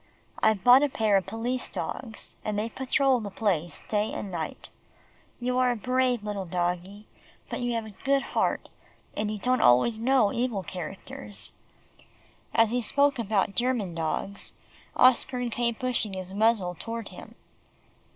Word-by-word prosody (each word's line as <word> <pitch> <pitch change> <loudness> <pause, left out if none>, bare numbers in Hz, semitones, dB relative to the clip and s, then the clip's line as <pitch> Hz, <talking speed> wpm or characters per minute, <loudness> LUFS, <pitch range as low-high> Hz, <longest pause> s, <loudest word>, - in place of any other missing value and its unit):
I've 215 -3 +2
bought 250 +2 +8
a 290 - +2
pair 220 -5 +2
of 190 -2 +2
police 235 +5 -2
dogs, 225 -4 -3
and 210 -1 -2
they 215 +2 -1
patrol 265 +1 +2
the 210 -3 -5
place 185 -5 -1
day 210 0 0
and 200 - -5
night. 165 -3 -5 0.7
You 250 +1 0
are 255 -1 +4
a 245 - +1
brave 250 0 +1
little 205 -3 -4
doggie, 180 +3 -2 0.5
but - - -3
you 245 -1 -1
have 230 -1 -2
a 215 - -9
good 275 0 +2
heart, - - 0 0.5
and 210 0 -1
you 215 - -3
don't 255 +4 +1
always 125 - +4
know 240 -3 +3
evil 235 -5 -1
characters." 195 +7 -7 1.0
As 225 -1 +3
he 245 +1 +1
spoke 280 +4 +2
about 205 -3 +1
German 240 -7 0
dogs, 165 +5 -2 0.4
Oscar 250 0 +4
came 235 0 0
pushing 250 -6 -1
his 185 0 -6
muzzle 205 -4 +2
toward 230 +6 -6
him. - - -12
220 Hz, 155 wpm, -27 LUFS, 195-250 Hz, 1.0 s, bought